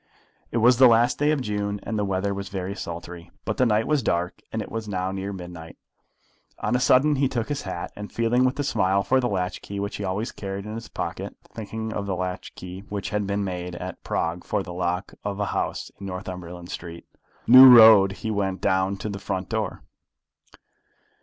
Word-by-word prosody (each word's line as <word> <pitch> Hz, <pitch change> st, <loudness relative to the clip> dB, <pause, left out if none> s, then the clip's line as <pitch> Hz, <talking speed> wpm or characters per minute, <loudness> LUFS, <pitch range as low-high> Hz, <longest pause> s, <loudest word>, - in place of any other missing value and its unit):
It -, -, -2 dB
was 120 Hz, +2 st, +5 dB
the 130 Hz, 0 st, +8 dB
last 120 Hz, +1 st, +3 dB
day 145 Hz, +1 st, +3 dB
of 150 Hz, -3 st, +1 dB
June, 105 Hz, -3 st, -2 dB
and 115 Hz, -, -4 dB
the 105 Hz, -, 0 dB
weather 100 Hz, 0 st, -1 dB
was 100 Hz, 0 st, -5 dB
very 95 Hz, 0 st, -4 dB
sultry; 85 Hz, -2 st, -7 dB, 0.2 s
but 110 Hz, -, -2 dB
the 130 Hz, -, +3 dB
night 110 Hz, 0 st, +2 dB
was 150 Hz, -2 st, +1 dB
dark, 90 Hz, -5 st, -1 dB
and -, -, -3 dB
it -, -, -6 dB
was 115 Hz, -1 st, -4 dB
now 95 Hz, -2 st, -2 dB
near 95 Hz, +1 st, -4 dB
midnight. 90 Hz, -3 st, -9 dB, 0.8 s
On 125 Hz, -, -1 dB
a -, -, +2 dB
sudden 135 Hz, +3 st, +4 dB
he 135 Hz, 0 st, +3 dB
took 120 Hz, -3 st, -2 dB
his 145 Hz, -1 st, -2 dB
hat, 90 Hz, -3 st, -5 dB
and 105 Hz, 0 st, -8 dB
feeling 115 Hz, +2 st, +2 dB
with 130 Hz, +2 st, +1 dB
a -, -, +1 dB
smile 100 Hz, -7 st, +1 dB
for 130 Hz, +5 st, +3 dB
the 125 Hz, -1 st, 0 dB
latch 90 Hz, -2 st, -2 dB
key 100 Hz, 0 st, -6 dB
which 100 Hz, +1 st, -3 dB
he 105 Hz, -, -5 dB
always 100 Hz, +4 st, -2 dB
carried 100 Hz, 0 st, -6 dB
in 105 Hz, -, -6 dB
his 115 Hz, 0 st, -7 dB
pocket, -, -, -5 dB, 0.2 s
thinking 110 Hz, 0 st, -5 dB
of 100 Hz, -2 st, -3 dB
the 95 Hz, -, -1 dB
latch 90 Hz, 0 st, -5 dB
key 90 Hz, 0 st, -8 dB
which 100 Hz, -1 st, -4 dB
had 105 Hz, -1 st, -1 dB
been 100 Hz, 0 st, -1 dB
made 90 Hz, -2 st, -4 dB
at 90 Hz, +1 st, -7 dB
Prague 85 Hz, +2 st, -2 dB
for 100 Hz, -, -1 dB
the 90 Hz, -, -8 dB
lock 90 Hz, +1 st, -2 dB
of 100 Hz, 0 st, -3 dB
a 105 Hz, -, +1 dB
house -, -, -3 dB
in 100 Hz, -, -7 dB
Northumberland 90 Hz, -2 st, -7 dB
Street, 85 Hz, 0 st, -8 dB, 0.4 s
New 130 Hz, +2 st, +10 dB
Road, 110 Hz, -5 st, +9 dB
he 110 Hz, +2 st, -4 dB
went 95 Hz, -2 st, -1 dB
down 95 Hz, 0 st, +1 dB
to 110 Hz, -, -5 dB
the 100 Hz, -2 st, -5 dB
front 95 Hz, -1 st, -4 dB
door. 110 Hz, -4 st, -3 dB
100 Hz, 215 wpm, -25 LUFS, 95-115 Hz, 0.8 s, New